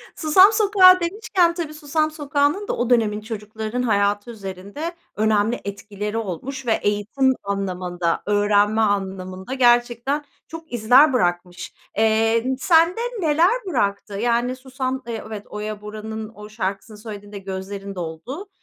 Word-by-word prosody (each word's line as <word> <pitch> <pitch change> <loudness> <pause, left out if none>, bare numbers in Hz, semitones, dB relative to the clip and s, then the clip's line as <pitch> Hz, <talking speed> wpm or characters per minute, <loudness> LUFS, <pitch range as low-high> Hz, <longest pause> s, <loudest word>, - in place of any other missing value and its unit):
Susam 370 +6 +6
Sokağı 385 -4 +6
demişken, 355 -1 +1
tabii 330 -3 -5
Susam 310 +1 -1
Sokağı'nın 290 +5 0
da - - -2
o 240 0 -1
dönemin 215 -3 +2
çocuklarının 220 +2 -5
hayatı 205 0 +1
üzerinde 200 - -7 0.2
önemli 215 +2 +1
etkileri 205 +1 -5
olmuş 230 - -5
ve 230 - 0
eğitim 210 +6 +1
anlamında, 180 -3 -2
öğrenme 205 +1 +2
anlamında 190 0 -2
gerçekten 240 +2 +2 0.2
çok 325 -3 -10
izler 250 +5 +5
bırakmış. 175 -4 -1 0.2
Eee, 225 +1 +3
n 260 0 -1
sende 335 - +3 0.2
neler 325 +2 +3 0.2
bıraktı? 205 - -1
Yani, 240 +4 0
Susam 260 0 -4
Eee, 230 -2 -4
evet, 210 -2 -7
Oya 210 0 -5
Bora'nın 215 +1 -6
o 210 0 -10
şarkısını 210 0 -4
söylediğinde 205 -1 -9
gözlerin 195 +1 -6
doldu, 180 - -6
220 Hz, 130 wpm, -22 LUFS, 205-275 Hz, 0.2 s, Susam